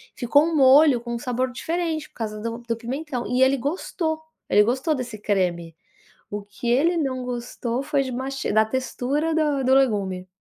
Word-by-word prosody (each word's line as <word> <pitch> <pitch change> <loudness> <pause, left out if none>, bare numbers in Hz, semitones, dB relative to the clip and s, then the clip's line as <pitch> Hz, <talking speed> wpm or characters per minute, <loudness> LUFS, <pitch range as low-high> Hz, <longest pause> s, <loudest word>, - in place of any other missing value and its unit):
Ficou 285 +4 +3
um 330 0 -1
molho 275 -1 +6
com 235 0 -4
sabor 250 +1 -1
diferente 320 +2 -3
por - - -42
causa 215 -2 -4
do 230 +1 -4
do 235 -1 -3
pimentão. 255 +2 -4
E 250 +1 0
ele 270 +1 +4
gostou, 315 +3 -2 0.3
ele 210 - +6
gostou 260 +8 0
desse 245 -4 -5
creme. 180 -5 -1 0.6
O 205 0 -4
que 205 +4 -7
ele 315 +8 +3
não 260 -5 -1
gostou 245 0 -3
foi 285 -1 +1
de 260 - -4
masti 265 +2 -3
da 220 +1 +5
textura 260 +6 -2
do 295 -4 +1
do 260 +1 +4
legume. 200 -8 +1
255 Hz, 180 wpm, -23 LUFS, 230-290 Hz, 0.6 s, molho